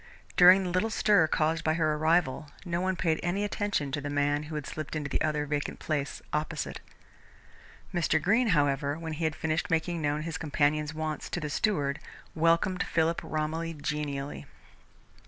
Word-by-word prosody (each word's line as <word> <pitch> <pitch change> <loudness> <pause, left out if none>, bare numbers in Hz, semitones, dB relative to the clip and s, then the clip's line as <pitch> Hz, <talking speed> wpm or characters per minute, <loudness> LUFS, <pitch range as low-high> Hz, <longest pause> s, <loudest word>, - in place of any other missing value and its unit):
During 185 +2 +8
the 180 - -2
little 185 +5 +1
stir 205 -6 +4
caused 155 +1 +1
by 155 0 +2
her 155 -2 +2
arrival, 155 -2 +1 0.2
no 175 0 -1
one 185 0 0
paid 165 -3 0
any 180 +4 -1
attention 205 -9 -1
to 145 - -2
the 145 - -4
man 145 0 +1
who 155 - -5
had 150 -2 -3
slipped 155 0 -6
into 145 -2 -3
the - - 0
other 150 -1 0
vacant 145 0 -2
place 145 -3 -3
opposite. 150 +1 -2 1.1
Mr. 165 -2 +2
Greene, 225 +9 +3
however, 145 0 +1
when 165 -1 -5
he 160 +1 -2
had 155 0 0
finished 160 0 -1
making 165 +1 0
known 150 0 0
his 160 -3 -4
companion's 150 0 0
wants 155 -1 -3
to - - -2
the 150 -1 -4
steward, 145 -6 0 0.3
welcomed 170 +3 +2
Philip 165 0 +1
Romilly 160 +2 -2
genially. 145 -1 -4
155 Hz, 175 wpm, -29 LUFS, 150-170 Hz, 1.1 s, During